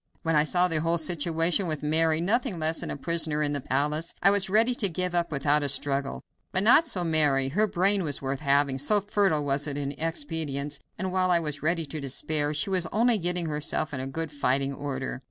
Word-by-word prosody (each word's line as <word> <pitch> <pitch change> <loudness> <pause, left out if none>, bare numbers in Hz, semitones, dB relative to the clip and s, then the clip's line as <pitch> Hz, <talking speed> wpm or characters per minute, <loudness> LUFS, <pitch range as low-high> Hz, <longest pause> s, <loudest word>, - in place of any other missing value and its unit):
When 165 -1 0
I 150 0 +4
saw 180 +3 +3
the 160 -3 0
whole 165 +1 0
situation, 165 +2 +1
with 155 -2 -3
Mary 160 +1 +2
nothing 220 +2 -1
less 160 0 +1
than - - -4
a - - -5
prisoner 160 -1 0
in 145 -1 -1
the 145 - -3
palace, 150 +6 -2
I 195 - +6
was 200 -1 +2
ready 225 +5 +3
to 210 -5 +2
give 180 +1 -3
up 170 -1 0
without 145 +1 +1
a 145 - -1
struggle, 140 0 0 0.3
but 185 - +1
not 265 +9 +5
so 185 - 0
Mary. 150 -5 +3
Her 210 +9 +1
brain 195 +1 +1
was 150 -5 -2
worth 135 0 -4
having, 140 -2 +1
so 205 +10 +3
fertile 195 -7 0
was 140 +1 -1
it 145 -1 -4
in 140 -1 -3
expedients, 150 -3 -3 0.2
and 185 +1 -4
while 185 0 +1
I 175 -1 +4
was 150 -3 -4
ready 165 +1 -1
to 155 +1 -7
despair, 145 +2 -1
she 150 +6 -1
was 180 -3 0
only 230 +1 +2
getting 175 0 -1
herself 150 0 -2
in 130 -2 -4
good 160 +2 -5
fighting 140 -1 -1
order. 135 -2 -5
160 Hz, 220 wpm, -26 LUFS, 145-180 Hz, 0.3 s, I